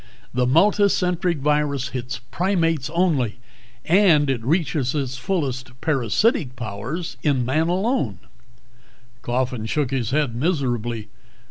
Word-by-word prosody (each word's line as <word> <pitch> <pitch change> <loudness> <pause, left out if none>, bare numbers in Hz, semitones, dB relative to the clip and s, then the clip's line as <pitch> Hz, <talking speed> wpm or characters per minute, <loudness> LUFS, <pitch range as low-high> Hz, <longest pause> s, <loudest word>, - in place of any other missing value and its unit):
The 125 0 +1
multicentric 180 +1 +3
virus 145 -2 +1
hits 125 -2 -5
primates 165 -6 0
only 155 - +1 0.5
and 165 -6 +4
it 120 -4 -3
reaches 150 -2 0
its 135 -3 -2
fullest 130 -5 -3
parasitic 140 - +1
powers 125 - -5
in 135 -5 +1
man 155 +6 +1
alone!" 180 - 0 1.0
Coffin 125 -2 -2
shook 140 +1 0
his 125 -5 -1
head 140 -4 0
miserably. 120 - -1
140 Hz, 110 wpm, -22 LUFS, 125-170 Hz, 1.0 s, and